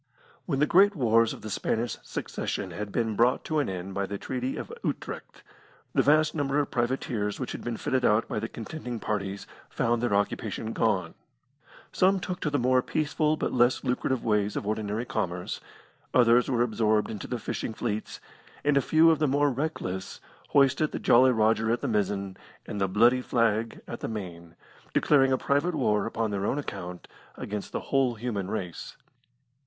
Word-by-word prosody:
When 145 -6 0
the 150 - +4
great 195 +6 +5
wars 115 -5 +3
of - - -9
the 110 - -5
Spanish 115 +4 -1
Succession - - -4
had 105 -1 -5
been 110 -1 -1
brought 120 +4 +3
to 155 -1 0
an 145 - 0
end 95 +1 -5
by 100 0 -2
the 100 - -4
Treaty 130 +4 -3
of - - -6
Utrecht, - - -5 0.5
the - - +4
vast 155 +1 +4
number 145 -2 0
of 145 -1 0
privateers 120 -4 -1
which 130 - -3
had - - -6
been 120 -2 -3
fitted 130 -1 0
out 105 0 +3
by - - -2
the 115 - -4
contending 120 0 -6
parties 100 -2 -3 0.2
found 120 -1 0
their 120 -4 +1
occupation 105 +2 -2
gone. 95 -7 0 0.8
Some 190 +1 +3
took 180 0 -4
to 150 - -1
the 145 - 0
more 130 0 +3
peaceful 155 +2 0
but - - -2
less 120 0 +3
lucrative 125 0 -1
ways 105 -2 +1
of - - -3
ordinary 110 +2 -2
commerce, 90 -5 -3 0.5
others 120 0 +5
were 120 -2 +2
absorbed 110 -2 +1
into 105 - -6
the 125 - -2
fishing 110 0 -4
fleets, 110 -2 -3 0.4
and 145 -1 +3
a - - +5
few 160 +5 +5
of 160 - +1
the 155 - +2
more 145 +1 +2
reckless 120 -10 -4 0.3
hoisted 140 +2 +3
the - - -1
Jolly 130 +2 +5
Rodger 110 -1 +2
at 120 +1 0
the - - -1
mizzen, 100 -2 -1 0.3
and 100 - -5
the 95 - +3
bloody 120 +6 +4
flag 115 -2 0
at - - -6
the - - -4
main, 85 -6 -7 0.4
declaring 135 -2 +4
a 130 - +3
private 145 +7 +1
war 105 -4 +1
upon 115 -1 -2
their 100 0 -1
own - - 0
account 90 -10 -6 0.3
against 105 -1 -5
the - - -2
whole 135 -3 +1
human 105 -5 -3
race. 90 -6 -5
115 Hz, 185 wpm, -27 LUFS, 105-135 Hz, 0.8 s, great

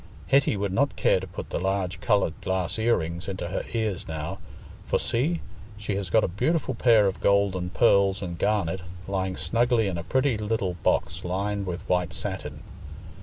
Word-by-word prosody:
Hetty 135 -4 +4
would 100 -1 -2
not 140 +7 +1
care - - +3
to 95 - -7
put 90 - -8
the - - -1
large 95 0 -1
coloured 100 -8 +2
glass 95 +2 -1
ear 115 +1 +3
rings 85 +2 -4
into 95 -3 -4
her 95 - -2
ears 110 -5 -1
now; 80 +5 -4 0.5
for - - +2
see! 155 +9 0 0.4
she 105 0 -3
has 95 -2 -3
got 110 +6 +4
a - - +2
beautiful 150 - 0
pair 115 -4 +5
of 95 -1 -1
gold 100 -1 +3
and 90 -1 -3
pearls 100 -2 +3
and 85 -2 -5
garnet, 95 -4 0 0.3
lying 95 -1 -2
snugly 120 -1 +2
in 90 -3 -2
a - - -5
pretty 130 +2 +1
little 105 -4 -1
box 85 +3 0
lined 100 +2 -2
with 90 0 -5
white 90 -2 +1
satin. - - -4
95 Hz, 185 wpm, -26 LUFS, 90-110 Hz, 0.5 s, pair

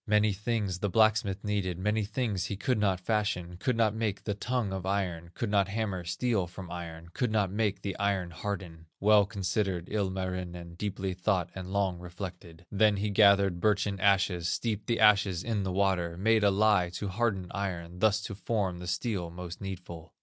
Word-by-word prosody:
"Many 105 0 +3
things 105 -2 -2
the 105 - 0
blacksmith 110 -1 +2
needed, 100 -4 -1
Many 105 +3 0
things 105 -3 -1
he 100 - -3
could 125 +1 0
not 95 -3 +2
fashion, 90 -4 -1
Could 125 +4 0
not 110 -2 +3
make 110 -3 -2
the 105 - -1
tongue 110 -1 -2
of 95 -1 -4
iron, 90 -4 -2
Could 115 -4 -2
not 100 -2 +3
hammer 100 -3 -2
steel 100 +1 0
from 90 0 -9
iron, 85 -1 -7
Could 125 -4 0
not 105 -4 +1
make 105 -1 -1
the 100 -2 -3
iron 100 -3 0
harden. 85 -3 -5
Well 105 0 +5
considered 95 -3 -1
Ilmarinen, 90 -4 -3
Deeply 95 0 -3
thought 90 -2 0
and 95 -1 -7
long 95 -3 0
reflected. 90 -2 -8
Then 105 0 +4
he 105 +1 -1
gathered 100 -3 +5
birchen 100 -2 +1
ashes, 95 -4 +2
Steeped 110 -3 -2
the 115 - +1
ashes 100 -4 +4
in 110 -3 -1
the 95 -1 -2
water, 90 -3 +1
Made 110 +3 +3
a 100 - +6
lye 100 -2 +3
to 100 +4 -3
harden 100 -2 0
iron, 90 -3 -4
Thus 110 0 +3
to 100 - -5
form 100 -3 -1
the 90 - -7
steel 90 0 -2
most 85 0 -8
needful. 85 -4 -7
100 Hz, 185 wpm, -30 LUFS, 90-105 Hz, -, a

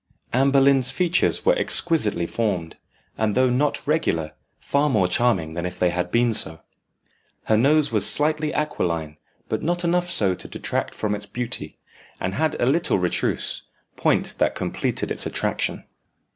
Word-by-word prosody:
Anne 135 +3 +3
Boleyn's 135 -2 +5
features 180 +5 +1
were - - +5
exquisitely 160 - +1
formed, 95 -6 -3 0.4
and 110 -2 0
though 130 -1 +3
not 140 +4 0
regular, 85 - 0 0.3
far 145 +1 0
more 105 -8 +2
charming 90 -5 0
than 85 +1 -4
if 90 0 -5
they 90 -1 +1
had 90 0 -2
been 120 +3 +2
so. 80 -6 0 0.8
Her 110 - +1
nose 145 +5 +3
was 105 -3 +5
slightly 150 0 +1
aquiline, 85 - -3 0.3
but - - -2
not 175 +2 -1
enough 175 +1 0
so 100 - +1
to - - -7
detract - - -3
from 105 -1 -2
its 105 0 -4
beauty, 120 +3 -2 0.4
and 95 - -3
had 160 +5 -1
a - - +2
little 160 - +2
retrousse; 90 -2 -1 0.3
point - - +1
that - - +1
completed - - -3
its - - 0
attraction. - - -2
120 Hz, 160 wpm, -23 LUFS, 90-150 Hz, 0.8 s, Boleyn's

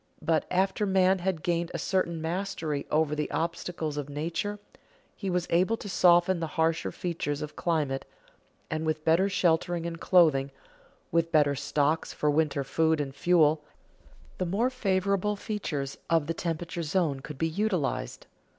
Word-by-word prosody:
But, 160 -1 +1
after 190 +3 +1
man 190 0 +3
had 180 -3 -2
gained 170 -1 0
a - - 0
certain 170 -3 0
mastery 160 -3 -3
over 155 -1 +2
the 150 -1 -2
obstacles 165 -2 -3
of 145 -1 -4
nature, 165 +7 -3 0.6
he 195 - -4
was 180 -1 0
able 185 +7 +3
to 210 - -8
soften 175 -1 +4
the 165 - -2
harsher 160 0 +1
features 150 -5 -3
of 150 - -7
climate, 150 -6 -1 0.7
and 155 0 -1
with 155 -1 -2
better 170 +5 +4
shelter 175 -1 +2
and 170 -1 -4
clothing, 155 -7 +4 0.6
with 165 0 +1
better 150 -3 +4
stocks 145 +2 0
of 150 -1 +1
winter 150 -2 +1
food 160 +3 +1
and 140 -2 -3
fuel, 155 -2 +3 0.8
the 185 - 0
more 225 +8 +1
favorable 200 -3 0
features 150 -10 -4
of 165 -3 +3
the 165 - -2
temperate 170 +1 -3
zone 155 -3 0
could 145 +1 -9
be 160 - +1
utilized. 165 - -2
165 Hz, 155 wpm, -28 LUFS, 150-185 Hz, 0.8 s, soften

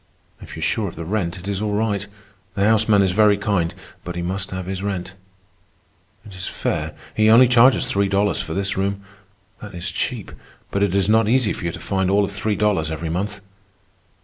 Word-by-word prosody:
"If - - -10
you - - -7
are - - -2
sure - - 0
of - - -8
the 85 - -6
rent, 90 -2 -2
it 90 +2 -10
is 100 0 -2
all 105 -1 -1
right. 105 -1 -1 0.5
The 100 - +1
houseman 110 -1 +4
is 95 - +1
very 105 +1 +4
kind, 100 -5 0 0.3
but 90 - -6
he 85 - -3
must 95 +3 -3
have 95 -1 -5
his 95 0 -4
rent. 95 -2 -4 1.1
It 105 - -12
is 90 -1 -7
fair. - - -3 0.2
He 110 0 +4
only 120 +3 +7
charges 125 +2 +5
three 100 0 +1
dollars 100 0 +1
for 80 - -5
this 100 0 0
room. 100 +1 -2 0.6
That 105 -3 -9
is 85 - -4
cheap. - - -3 0.4
But 100 - -1
it 100 -2 +1
is 100 -1 +2
not 110 0 +3
easy 120 -3 +3
for - - -6
you 85 - -1
to - - -8
find 95 -2 -1
all 100 +1 +3
of 100 - -6
three 100 +1 -1
dollars 100 -7 +1
every 80 +1 -4
month." 100 +3 -3
100 Hz, 215 wpm, -21 LUFS, 95-105 Hz, 1.1 s, only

